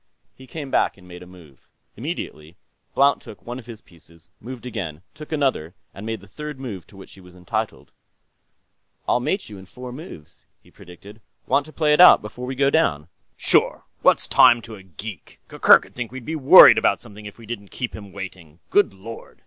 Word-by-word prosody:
He 130 Hz, -, -16 dB
came 140 Hz, 0 st, -8 dB
back -, -, +1 dB
and 90 Hz, -2 st, -18 dB
made 90 Hz, 0 st, -11 dB
a 90 Hz, -, -12 dB
move. 85 Hz, -7 st, -18 dB, 0.3 s
Immediately, 80 Hz, +4 st, -7 dB, 0.4 s
Blount 140 Hz, +1 st, +3 dB
took -, -, -14 dB
one 120 Hz, +2 st, -6 dB
of 120 Hz, -, -15 dB
his 115 Hz, -3 st, -10 dB
pieces, 85 Hz, 0 st, -21 dB
moved 125 Hz, +2 st, -10 dB
again, 90 Hz, -10 st, -6 dB
took 155 Hz, +1 st, -12 dB
another, 130 Hz, -, -1 dB, 0.2 s
and 100 Hz, +3 st, -9 dB
made 115 Hz, -3 st, -4 dB
the 100 Hz, -, -16 dB
third 150 Hz, +6 st, -8 dB
move 105 Hz, -10 st, -8 dB
to 100 Hz, -, -18 dB
which 95 Hz, -, -13 dB
he 95 Hz, -, -16 dB
was 90 Hz, 0 st, -17 dB
entitled. 90 Hz, -1 st, -5 dB, 1.2 s
"I'll -, -, +2 dB
mate 190 Hz, +10 st, -2 dB
you 105 Hz, -3 st, -11 dB
in 95 Hz, -, -14 dB
four 125 Hz, +4 st, -10 dB
moves," 125 Hz, -, -12 dB, 0.2 s
he -, -, -22 dB
predicted. 100 Hz, +5 st, -15 dB, 0.2 s
"Want 145 Hz, -, +1 dB
to -, -, -12 dB
play 155 Hz, -1 st, +1 dB
it 150 Hz, -, +5 dB
out, 180 Hz, -, +9 dB
before 125 Hz, +4 st, -8 dB
we 130 Hz, -, -4 dB
go 140 Hz, +1 st, +2 dB
down?" 80 Hz, -, 0 dB, 0.3 s
"Sure; -, -, +1 dB, 0.2 s
what's -, -, +5 dB
time 120 Hz, -1 st, +6 dB
to 115 Hz, -, -11 dB
a 100 Hz, -, -11 dB
geek? 95 Hz, +1 st, -11 dB
Gurgurk'd -, -, +4 dB
think 120 Hz, -2 st, -6 dB
we 130 Hz, +5 st, -6 dB
were 155 Hz, -, -6 dB
worried 130 Hz, -, +9 dB
about -, -, +1 dB
something 105 Hz, -2 st, -12 dB
if 105 Hz, -, -12 dB
we 115 Hz, -, -14 dB
didn't 100 Hz, -3 st, -8 dB
keep 125 Hz, -2 st, -6 dB
him 100 Hz, -2 st, -11 dB
waiting.... 90 Hz, -5 st, -10 dB
Good 205 Hz, -, +2 dB
Lord! 110 Hz, +4 st, -11 dB
110 Hz, 205 wpm, -22 LUFS, 90-130 Hz, 1.2 s, out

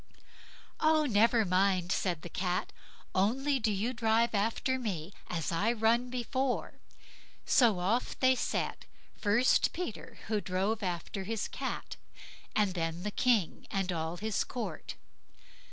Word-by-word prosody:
"Oh! 310 Hz, -1 st, +4 dB
never 230 Hz, -1 st, +4 dB
mind", 185 Hz, -1 st, +2 dB
said 175 Hz, -6 st, 0 dB
the -, -, -5 dB
Cat; 180 Hz, +1 st, -2 dB, 0.4 s
"only 265 Hz, +9 st, +2 dB
do 220 Hz, -2 st, +1 dB
you 210 Hz, +5 st, -1 dB
drive 230 Hz, 0 st, +2 dB
after 230 Hz, +5 st, 0 dB
me 190 Hz, -7 st, -4 dB, 0.2 s
as 165 Hz, -3 st, -2 dB
I 200 Hz, +7 st, +2 dB
run 235 Hz, +2 st, +2 dB
before." 255 Hz, +1 st, -2 dB, 0.7 s
So 230 Hz, -7 st, +4 dB
off 200 Hz, +8 st, 0 dB
they 260 Hz, 0 st, +5 dB
set; 255 Hz, -, -2 dB, 0.3 s
first 225 Hz, +5 st, +3 dB
Peter, 345 Hz, -, -6 dB
who 215 Hz, -1 st, 0 dB
drove 195 Hz, +4 st, -1 dB
after 180 Hz, +1 st, -3 dB
his 220 Hz, +2 st, -2 dB
Cat, -, -, -5 dB, 0.6 s
and 205 Hz, -3 st, +2 dB
then 165 Hz, 0 st, -2 dB
the 210 Hz, -, -2 dB
King 225 Hz, -6 st, +1 dB
and 195 Hz, -2 st, -1 dB
all 165 Hz, 0 st, -3 dB
his 215 Hz, +2 st, -1 dB
court. 215 Hz, -10 st, -5 dB
210 Hz, 135 wpm, -31 LUFS, 185-240 Hz, 0.7 s, they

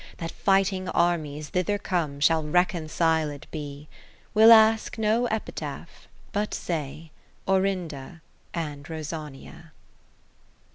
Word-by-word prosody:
That 165 Hz, 0 st, -5 dB
fighting 195 Hz, -1 st, +1 dB
armies, 155 Hz, -5 st, 0 dB
thither 185 Hz, +3 st, 0 dB
come. 160 Hz, -8 st, -2 dB
Shall 160 Hz, +2 st, +4 dB
reconciled 160 Hz, -3 st, 0 dB
be. 145 Hz, -1 st, -7 dB, 0.5 s
We'll 220 Hz, +1 st, +8 dB
ask 220 Hz, 0 st, +5 dB
no 220 Hz, +3 st, +2 dB
Epitaph, 220 Hz, -1 st, -6 dB, 0.2 s
but 210 Hz, +1 st, -1 dB
say 155 Hz, -1 st, -5 dB, 0.4 s
Orinda 180 Hz, -6 st, -1 dB, 0.3 s
and 150 Hz, -4 st, -4 dB
RosANiA. 155 Hz, -3 st, -8 dB
165 Hz, 95 wpm, -26 LUFS, 150-195 Hz, 0.5 s, We'll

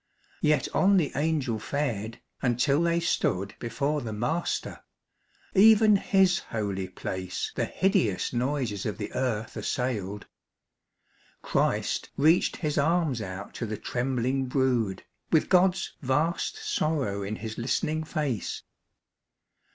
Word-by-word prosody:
Yet 150 Hz, 0 st, +2 dB
on 195 Hz, +1 st, +4 dB
the 160 Hz, -6 st, +1 dB
Angel 145 Hz, -7 st, 0 dB
fared, 115 Hz, -4 st, -3 dB, 0.2 s
until 135 Hz, +4 st, +2 dB
they 170 Hz, 0 st, +2 dB
stood 100 Hz, -, 0 dB
Before 145 Hz, +5 st, -1 dB
the 115 Hz, -, -5 dB
Master. 135 Hz, +11 st, -2 dB, 0.7 s
(Even 215 Hz, +1 st, +7 dB
His 190 Hz, -1 st, +3 dB
holy 100 Hz, -4 st, -3 dB
place 95 Hz, 0 st, -4 dB
The -, -, 0 dB
hideous 185 Hz, -, +1 dB
noises 125 Hz, -5 st, -1 dB
of 105 Hz, -, -3 dB
the -, -, -5 dB
earth 115 Hz, -4 st, -2 dB
assailed.) 105 Hz, -6 st, -2 dB, 1.2 s
Christ -, -, 0 dB
reached 160 Hz, +5 st, +4 dB
His 150 Hz, -3 st, -1 dB
arms 155 Hz, -5 st, +1 dB
out 95 Hz, 0 st, -6 dB
to 115 Hz, -, -4 dB
the 105 Hz, 0 st, -4 dB
trembling 130 Hz, +1 st, -1 dB
brood, 125 Hz, -7 st, 0 dB, 0.3 s
With 160 Hz, -, +3 dB
God's 185 Hz, 0 st, +3 dB
vast 155 Hz, -, 0 dB
sorrow 155 Hz, -, -1 dB
in 100 Hz, +2 st, -3 dB
His 110 Hz, +1 st, -6 dB
listening 155 Hz, +6 st, 0 dB
face. 150 Hz, -, -3 dB
130 Hz, 120 wpm, -27 LUFS, 110-160 Hz, 1.2 s, Even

